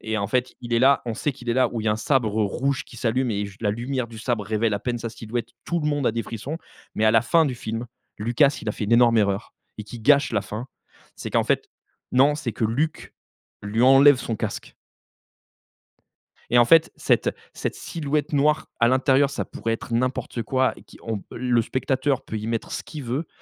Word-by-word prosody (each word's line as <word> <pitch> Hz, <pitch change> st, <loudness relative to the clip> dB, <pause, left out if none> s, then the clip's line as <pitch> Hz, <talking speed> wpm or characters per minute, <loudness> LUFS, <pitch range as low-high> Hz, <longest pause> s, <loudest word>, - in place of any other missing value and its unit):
et 110 Hz, 0 st, -3 dB
en 100 Hz, -, -1 dB
fait 125 Hz, +3 st, -1 dB
il 120 Hz, -1 st, -7 dB
est 115 Hz, -, +4 dB
là. 135 Hz, +1 st, +4 dB
On 115 Hz, -2 st, -3 dB
sait 145 Hz, -, -1 dB
qu'il 120 Hz, -1 st, -11 dB
est 115 Hz, -, +1 dB
là 130 Hz, -2 st, +3 dB
où 115 Hz, -, -2 dB
il -, -, -6 dB
y -, -, +2 dB
a -, -, +3 dB
un -, -, -1 dB
sabre 110 Hz, -3 st, +1 dB
rouge 130 Hz, +6 st, -1 dB
qui 120 Hz, -, -14 dB
s'allume 120 Hz, +2 st, 0 dB
et 100 Hz, -1 st, -1 dB
juste 100 Hz, +3 st, -13 dB
la 105 Hz, -, +2 dB
lumière 120 Hz, +2 st, -3 dB
du 115 Hz, -1 st, -10 dB
sabre 115 Hz, -3 st, -2 dB
révèle 110 Hz, 0 st, 0 dB
à -, -, -1 dB
peine 120 Hz, -1 st, -2 dB
sa 115 Hz, -1 st, -5 dB
silhouette. 115 Hz, +1 st, -5 dB
Tout 170 Hz, -1 st, -1 dB
le 150 Hz, -, -2 dB
monde 145 Hz, -3 st, 0 dB
a -, -, +2 dB
des 115 Hz, 0 st, -2 dB
frissons, 130 Hz, +8 st, -6 dB, 0.4 s
mais 110 Hz, -, +1 dB
à 110 Hz, -, +6 dB
la 115 Hz, -, +5 dB
fin 165 Hz, +6 st, +4 dB
du 130 Hz, -, -2 dB
film, 115 Hz, 0 st, -5 dB, 0.3 s
Lucas, 125 Hz, +7 st, +2 dB
il 110 Hz, -, -4 dB
a -, -, 0 dB
fait 105 Hz, -, -4 dB
une 110 Hz, -, -1 dB
énorme 115 Hz, -1 st, +5 dB
erreur 100 Hz, 0 st, 0 dB, 0.3 s
et 105 Hz, -, -5 dB
qui 115 Hz, +3 st, -9 dB
gâche 140 Hz, +2 st, +4 dB
la 100 Hz, -2 st, +1 dB
fin. 110 Hz, +5 st, -6 dB, 0.5 s
C'est -, -, -6 dB
qu'en -, -, +2 dB
fait -, -, 0 dB, 0.4 s
non, 140 Hz, +4 st, +5 dB
c'est 135 Hz, -7 st, -4 dB
que -, -, -2 dB
Luke 140 Hz, +9 st, -2 dB, 0.5 s
lui 110 Hz, +4 st, 0 dB
enlève 135 Hz, +2 st, +7 dB
son 115 Hz, -3 st, -3 dB
casque. -, -, -5 dB, 1.8 s
Et 120 Hz, -, +4 dB
en 120 Hz, -, +7 dB
fait, 160 Hz, +4 st, +5 dB
cette -, -, +1 dB, 0.2 s
cette -, -, -3 dB
silhouette 150 Hz, -2 st, -3 dB
noire 150 Hz, +2 st, +2 dB
à 115 Hz, -, +5 dB
l'intérieur, 135 Hz, +2 st, +3 dB
ça -, -, -3 dB
pourrait 115 Hz, 0 st, -3 dB
être 115 Hz, -, -6 dB
n'importe 125 Hz, -1 st, -1 dB
quoi 130 Hz, +3 st, +1 dB
qui -, -, -15 dB
on 110 Hz, -3 st, -3 dB
p -, -, -18 dB
le 125 Hz, -1 st, +2 dB
spectateur 130 Hz, +3 st, -1 dB
peut 110 Hz, -, -5 dB
y 110 Hz, +1 st, -5 dB
mettre 115 Hz, -1 st, -3 dB
ce -, -, -4 dB
qu'il 150 Hz, -3 st, -8 dB
veut. 130 Hz, +7 st, -3 dB
120 Hz, 235 wpm, -24 LUFS, 110-135 Hz, 1.8 s, enlève